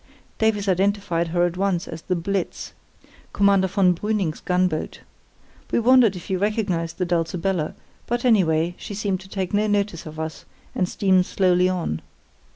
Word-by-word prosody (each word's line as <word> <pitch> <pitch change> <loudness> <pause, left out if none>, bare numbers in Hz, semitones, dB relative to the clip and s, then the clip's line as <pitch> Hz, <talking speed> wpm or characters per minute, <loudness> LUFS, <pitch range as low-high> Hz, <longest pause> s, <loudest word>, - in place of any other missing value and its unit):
"Davies 215 -2 +1
identified 190 -2 +1
her 175 +1 +2
at 175 0 -3
once 190 -3 0
as 160 -1 -7
the 185 - -1
Blitz, 185 +2 -3 0.6
Commander 200 -1 +4
von 190 -2 +3
Brüning's 195 -4 -2
gunboat. 180 -3 -1 0.7
We - - +2
wondered 235 -3 +5
if 175 - -8
he 190 - -1
recognised 195 -4 -1
the 180 - 0
Dulcibella, 170 0 -1 0.3
but, 240 +1 -1
anyway, 175 -7 +3
she 205 - -7
seemed 195 -2 -1
to 190 +1 -14
take 190 -1 -3
no 210 +1 +2
notice 200 -5 -1
of 155 0 -9
us 160 0 -5 0.3
and 180 -1 0
steamed 185 -2 +2
slowly 180 -1 +3
on. 170 - -2
185 Hz, 160 wpm, -23 LUFS, 170-200 Hz, 0.7 s, wondered